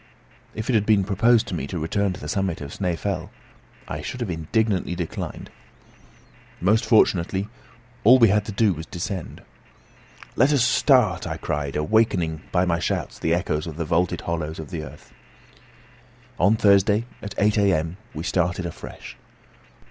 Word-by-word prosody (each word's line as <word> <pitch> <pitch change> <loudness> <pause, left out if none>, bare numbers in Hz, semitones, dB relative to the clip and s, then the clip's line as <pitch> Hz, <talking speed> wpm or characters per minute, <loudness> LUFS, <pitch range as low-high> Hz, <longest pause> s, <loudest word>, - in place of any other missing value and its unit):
If 110 +1 -4
it 130 - +1
had 105 -2 +2
been 105 -3 +4
proposed 110 +4 +3
to - - -5
me 70 -5 -3
to 90 - -5
return 95 +5 0
to - - -9
the 75 - -7
summit 95 0 -1
of 70 -1 -7
Snæfell, 90 -1 -2 0.6
I 75 - -5
should 125 - -6
have 110 -6 -2
indignantly 90 +3 -1
declined. 85 -2 -5 1.1
Most 110 +5 +2
fortunately, 95 -3 +3 0.6
all 125 +5 +8
we 115 -4 +6
had 105 +1 +2
to 110 - -5
do 105 -1 +2
was 80 0 -8
to - - -19
descend. 90 0 -5 0.9
"Let 135 +5 +4
us 135 -5 +3
start!" 125 - +3
I 80 -1 -4
cried, 75 -4 -3
awakening 80 -1 +1
by 90 0 +2
my 85 -2 0
shouts 85 - -3
the 80 +1 +1
echoes 75 -2 -2
of 80 -2 -7
the 85 - -2
vaulted 85 +2 0
hollows 80 -2 -3
of 80 +1 -8
the 85 -4 -4
earth. 70 - -13 1.3
On 100 +5 +4
Thursday, 105 +1 +3 0.2
at 100 - -7
8 105 +1 +2
a.m., 90 -4 +1 0.2
we 80 - -4
started 90 0 0
afresh. 85 - -9
90 Hz, 165 wpm, -23 LUFS, 80-105 Hz, 1.3 s, all